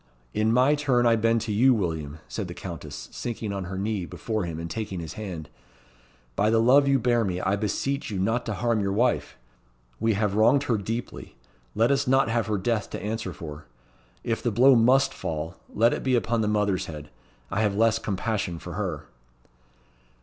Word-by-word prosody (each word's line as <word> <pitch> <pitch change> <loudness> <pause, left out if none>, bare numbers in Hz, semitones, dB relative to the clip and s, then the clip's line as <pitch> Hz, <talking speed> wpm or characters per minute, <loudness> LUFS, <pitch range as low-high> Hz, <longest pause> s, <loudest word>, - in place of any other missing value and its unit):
"In 110 +1 +2
my 130 +5 +4
turn 135 -5 +2
I 115 -1 +5
bend 115 +1 +2
to 115 -1 -3
you, 125 +5 +5
William," 80 -7 -3
said - - -4
the - - -8
Countess, - - -7
sinking 110 -3 -4
on 100 -2 -4
her 95 +1 -5
knee 100 -1 -1
before 110 -4 -3
him, 80 -2 -5
and 85 - -4
taking 95 +2 -4
his 80 -2 -6
hand. 90 -8 -6 0.9
"By 105 +7 +2
the 115 - +3
love 135 +5 +5
you 140 0 +4
bear 120 -1 +2
me, 90 -3 -2
I 95 +2 +1
beseech 110 +7 -2
you 100 - -3
not 115 +6 0
to 110 - -2
harm 115 +1 +1
your 100 -1 0
wife! 120 - 0 0.6
We 115 0 +2
have 105 -1 0
wronged 110 +7 +4
her 115 -6 0
deeply 115 - -5 0.4
let 115 +4 +3
us 140 - +1
not 135 -2 +3
have 115 -1 0
her 105 -1 0
death 105 +2 -1
to - - -6
answer 110 -2 -3
for. 75 -3 -9 0.6
If 115 -1 -1
the 120 - 0
blow 125 +5 +6
must 125 +4 +4
fall, 80 +2 -4
let 115 +3 +3
it - - -3
be 130 -1 +2
upon 115 -1 +1
the 105 - 0
mother's 105 -3 0
head. 75 -2 -8 0.4
I 105 - 0
have 105 -2 +1
less 115 +1 +3
compassion 100 -3 -2
for 85 +1 -8
her." 90 -6 -3
110 Hz, 200 wpm, -26 LUFS, 95-120 Hz, 0.9 s, blow